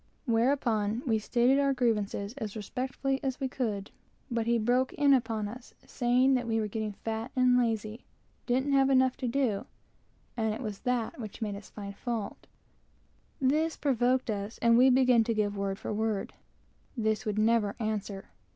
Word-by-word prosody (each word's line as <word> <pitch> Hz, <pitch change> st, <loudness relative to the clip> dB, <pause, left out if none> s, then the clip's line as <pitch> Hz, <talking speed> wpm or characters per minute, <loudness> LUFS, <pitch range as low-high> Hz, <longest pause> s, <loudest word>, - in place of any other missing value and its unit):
Whereupon 230 Hz, -2 st, +1 dB
we 225 Hz, -4 st, +2 dB
stated 245 Hz, +5 st, +2 dB
our 275 Hz, -1 st, +2 dB
grievances 210 Hz, -4 st, 0 dB
as 215 Hz, -3 st, -5 dB
respectfully 260 Hz, +5 st, -3 dB
as 265 Hz, -1 st, -2 dB
we 270 Hz, -, -1 dB
could, 215 Hz, -6 st, -3 dB, 0.4 s
but 230 Hz, -1 st, -1 dB
he 235 Hz, 0 st, +3 dB
broke 245 Hz, +3 st, +1 dB
in 285 Hz, -1 st, +4 dB
upon 225 Hz, -4 st, 0 dB
us, 240 Hz, +4 st, -10 dB
saying 250 Hz, +2 st, +2 dB
that 245 Hz, -2 st, 0 dB
we 225 Hz, -1 st, +1 dB
were 215 Hz, -, -1 dB
getting 215 Hz, 0 st, -3 dB
fat 225 Hz, +4 st, -5 dB
and 255 Hz, -1 st, +4 dB
lazy, 225 Hz, -2 st, -1 dB, 0.4 s
didn't 260 Hz, +3 st, +1 dB
have 270 Hz, -1 st, +4 dB
enough 260 Hz, -1 st, +4 dB
to 260 Hz, -2 st, -3 dB
do, 240 Hz, -5 st, 0 dB, 0.7 s
and 220 Hz, -2 st, 0 dB, 0.2 s
that 235 Hz, -1 st, -3 dB
made 210 Hz, -2 st, -2 dB
us 200 Hz, 0 st, -10 dB
find 200 Hz, -1 st, -8 dB
fault. 225 Hz, -3 st, -5 dB, 0.9 s
This 305 Hz, +5 st, +1 dB
provoked 255 Hz, -2 st, +1 dB
us, 205 Hz, +1 st, -4 dB
and 230 Hz, 0 st, +4 dB
we 255 Hz, +3 st, +6 dB
began 250 Hz, -2 st, +5 dB
to 230 Hz, 0 st, -1 dB
give 205 Hz, -1 st, 0 dB
word 195 Hz, -1 st, -2 dB
for 215 Hz, -, -4 dB
word. 215 Hz, -2 st, -2 dB, 0.6 s
This 220 Hz, -1 st, 0 dB
would 210 Hz, -1 st, -1 dB
never 215 Hz, -1 st, +2 dB
answer. 210 Hz, -3 st, -3 dB
230 Hz, 160 wpm, -29 LUFS, 215-255 Hz, 0.9 s, we